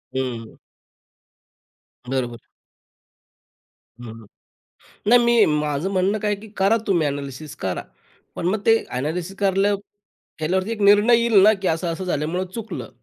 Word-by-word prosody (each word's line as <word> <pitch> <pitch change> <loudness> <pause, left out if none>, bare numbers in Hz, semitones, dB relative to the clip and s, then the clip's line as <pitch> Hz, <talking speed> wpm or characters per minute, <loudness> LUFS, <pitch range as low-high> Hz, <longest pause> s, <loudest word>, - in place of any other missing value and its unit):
हं. 120 -4 -4 1.5
बरोबर. 125 -2 -3 1.7
हं. 115 -1 -10 0.8
नाही, 245 +3 +7
मी 235 -2 +5
माझं 150 +4 -2
म्हणणं 190 +2 +1
काय 210 0 -1
आहे 205 - -2
की 220 - -11
करा 195 +4 +3
तुम्ही 170 -6 +2
अ‍ॅनॅलिसिस 140 +1 -6
करा. - - -4 0.5
पण - - -4
मग 205 +4 0
ते 225 0 +6
अ‍ॅनॅलिसिस 165 +8 -4
करल्या 195 +1 +2 0.7
केल्यावरती 185 +6 -1
एक 220 -2 -4
निर्णय 205 +4 +6
येईल 230 -4 +4
ना 215 +2 +7
की 190 - -1
असं 165 +2 -1
-असं 185 - -6
झाल्यामुळं 175 +2 -2
चुकलं. 225 -1 -6
185 Hz, 135 wpm, -22 LUFS, 145-205 Hz, 1.7 s, नाही